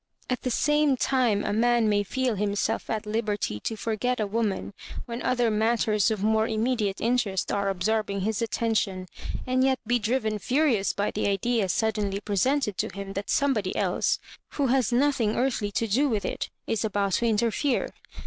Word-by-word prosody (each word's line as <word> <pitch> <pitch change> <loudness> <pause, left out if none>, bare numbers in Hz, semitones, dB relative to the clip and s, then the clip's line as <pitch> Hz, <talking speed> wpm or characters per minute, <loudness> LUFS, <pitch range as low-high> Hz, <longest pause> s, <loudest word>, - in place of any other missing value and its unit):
At 250 - -1
the 255 - -2
same 295 +2 +2
time 245 -6 +2
a - - 0
man 235 +1 +3
may 205 -1 +3
feel 250 +4 -1
himself 205 0 -1
at 220 0 -2
liberty 210 - -2
to 225 - -3
forget 225 +3 -1
a 215 - +1
woman 205 -1 -2 0.3
when 235 0 -5
other 245 -3 +1
matters 215 0 +2
of 215 -3 -2
more 220 +1 +3
immediate 220 -3 0
interest 225 -5 0
are 200 -1 0
absorbing 200 +1 -1
his 215 +2 -1
attention, 215 -4 -1 0.4
and 255 0 +2
yet 265 0 +3
be 245 +2 +2
driven 220 -1 0
furious 250 -6 +2
by 205 +1 -1
the - - -1
idea 200 +1 +1
suddenly 205 -1 0
presented 210 +2 0
to - - 0
him 195 0 -7
that 200 +1 -5
somebody 245 -10 +1
else, - - +1 0.4
who 285 - 0
has 260 -3 +2
nothing 245 -4 +2
earthly 240 -5 0
to 230 - 0
do 260 +7 +2
with 215 -4 -1
it, - - -3 0.2
is 225 -1 -1
about 205 -2 0
to 235 - +2
interfere. 230 +5 +1
220 Hz, 175 wpm, -26 LUFS, 205-245 Hz, 0.4 s, man